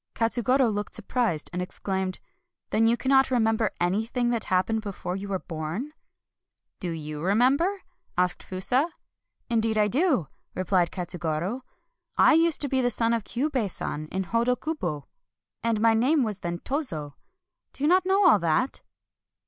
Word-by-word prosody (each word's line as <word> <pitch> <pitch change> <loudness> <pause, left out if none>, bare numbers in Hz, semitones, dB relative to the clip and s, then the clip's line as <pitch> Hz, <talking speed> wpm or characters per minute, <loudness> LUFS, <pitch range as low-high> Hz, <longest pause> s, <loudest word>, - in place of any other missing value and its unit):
Katsugoro 240 +3 +2
looked 205 0 -3
surprised 220 -7 -1
and 180 - -2
exclaimed: 190 0 -2 0.3
" 345 - -60
Then 225 +1 +3
you 235 +1 +3
cannot 265 +1 +3
remember 225 -3 +2
anything 225 +7 0
that 230 -2 -1
happened 190 +4 +1
before 195 -3 -5
you 195 +1 -5
were 195 -1 -1
born? 170 - -5 0.3
" - - -64
" - - -52
Do 180 - -3
you 155 -2 -5
remember? 265 - +2 0.2
" - - -43
asked 180 0 +1
Fusa. 250 - 0 0.3
" - - -52
Indeed 225 -1 +1
I 210 -1 +4
do," 265 - +2 0.3
replied 185 -1 +1
Katsugoro. 175 +4 -3 0.3
" - - -44
I - - +6
used 330 0 +4
to 285 - +1
be 265 -1 +1
the 245 - +2
son 230 0 +1
of 230 -2 0
Kyubei 255 -4 -1
San 155 -3 -4
of 190 0 -2
Hodo 235 +5 +1
kubo, 175 - -4 0.5
and 230 -2 0
my 225 +1 +4
name 260 +6 +3
was 210 -4 -3
then 175 -2 -3
Tozo 170 - -3 0.3
— - - -61
do 275 - -3
you - - +4
not 370 +3 +4
know 385 +1 +4
all 215 - +6
that 170 +11 0
225 Hz, 175 wpm, -26 LUFS, 180-260 Hz, 0.5 s, I